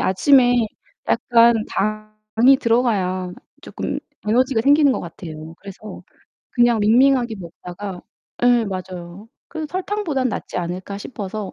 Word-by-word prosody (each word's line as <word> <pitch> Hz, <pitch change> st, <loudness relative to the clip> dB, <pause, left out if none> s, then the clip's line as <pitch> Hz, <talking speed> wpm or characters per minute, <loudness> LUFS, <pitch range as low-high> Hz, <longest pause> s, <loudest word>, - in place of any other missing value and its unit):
아침에 245 Hz, +6 st, +4 dB, 0.5 s
약간 235 Hz, -1 st, +4 dB
당이 215 Hz, +4 st, +1 dB
들어가야 205 Hz, -8 st, 0 dB, 0.3 s
쪼끔 -, -, -5 dB, 0.3 s
에너지가 250 Hz, +2 st, +2 dB
생기는 285 Hz, 0 st, +5 dB
것 -, -, -3 dB
같아요. 160 Hz, -2 st, -9 dB
그래서 200 Hz, +2 st, -10 dB, 0.5 s
그냥 240 Hz, -2 st, +3 dB
밍밍하게 240 Hz, +2 st, +3 dB
먹다가 180 Hz, +1 st, -8 dB, 0.4 s
예 245 Hz, -1 st, +4 dB
맞아요. 185 Hz, +1 st, -7 dB, 0.2 s
'그래도 315 Hz, -2 st, -5 dB
설탕보다는 360 Hz, -7 st, -2 dB
낫지 205 Hz, -, -5 dB
않을까?' 185 Hz, +3 st, -5 dB
싶어서 205 Hz, -3 st, -6 dB
215 Hz, 290 characters per minute, -20 LUFS, 185-250 Hz, 0.5 s, 생기는